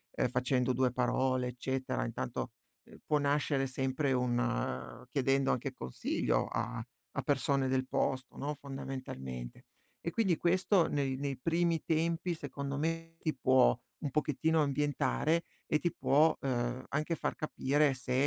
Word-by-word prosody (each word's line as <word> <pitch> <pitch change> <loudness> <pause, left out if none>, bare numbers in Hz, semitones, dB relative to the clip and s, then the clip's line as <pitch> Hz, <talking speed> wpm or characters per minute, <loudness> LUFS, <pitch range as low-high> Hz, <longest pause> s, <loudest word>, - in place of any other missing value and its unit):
ehm, - - +2
facendo 125 +1 +1
2 130 0 +2
parole 130 +1 +1
eccetera. 130 - -2
Intanto 65 +1 -3 0.5
può 150 - +2
nascere 145 -1 +1
sempre 130 +2 0
un 120 - -1
chiedendo 135 0 +2
anche 130 +2 -1
consiglio 65 - -1
a 115 0 -3 0.3
a 135 - -1
persone 140 0 +2
del 130 0 +1
posto, 130 0 -1
no, 145 +2 -2
fondamentalmente. 130 - -6 0.4
E 170 - -2
quindi 190 -4 +2
questo 180 +1 +3
nei, 140 -2 0
nei 140 -1 -2
primi 165 +3 +1
tempi 165 +2 +1
secondo 140 -2 -4
me 165 +2 -2
ti 155 -3 -1
può 130 - +4 0.2
un 145 - -2
pochettino 155 +2 +2
ambientare 150 +3 +1 0.2
e 155 - +2
ti 175 0 0
può, 155 0 +4
ehm, 125 -1 -1
anche 155 +4 0
far - - -2
capire 145 -1 +2
se 125 0 -4
135 Hz, 140 wpm, -33 LUFS, 125-155 Hz, 0.5 s, può